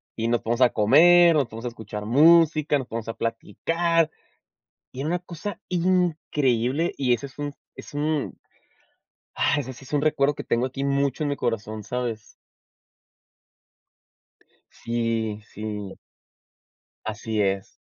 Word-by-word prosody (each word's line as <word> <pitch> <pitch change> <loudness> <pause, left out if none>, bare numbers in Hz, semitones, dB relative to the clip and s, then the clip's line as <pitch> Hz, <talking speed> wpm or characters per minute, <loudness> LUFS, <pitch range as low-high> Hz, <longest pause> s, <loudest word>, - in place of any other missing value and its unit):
y 115 0 -2
nos 120 0 +1
ponemos 120 +2 -1
a 125 - +7
comer, 165 +10 +6
nos 145 -3 +3
ponemos 115 +2 -9
a - - 0
escuchar 110 -3 -7
música, 155 +3 +5
nos 130 - -6
ponemos 115 -1 -5
a - - -2
platicar. 165 - 0 0.8
Y 130 - -10
era 145 - -2
una 175 +1 0
cosa 180 +2 -7
increíble 165 -6 +1
y 130 -3 +2
eso 120 +3 -2
es 135 - -20
un 145 -1 -4 0.2
es - - -11
un 150 0 -1 1.0
¡ah! - - +2
ese 130 -2 -4
sí 130 +2 -14
es 130 - -14
un 145 -1 +1
recuerdo 145 -1 +2
que - - -7
tengo 120 +2 +1
aquí 130 +1 -5
mucho 140 +1 0
en 150 - 0
mi 145 - -1
corazón, 110 -3 -3
¿sabes? 120 -2 -4 2.4
Sí, 115 -2 -2
sí. 105 -2 -6 1.1
Así 110 0 -3
es. 95 -1 -1
130 Hz, 145 wpm, -24 LUFS, 115-155 Hz, 2.4 s, a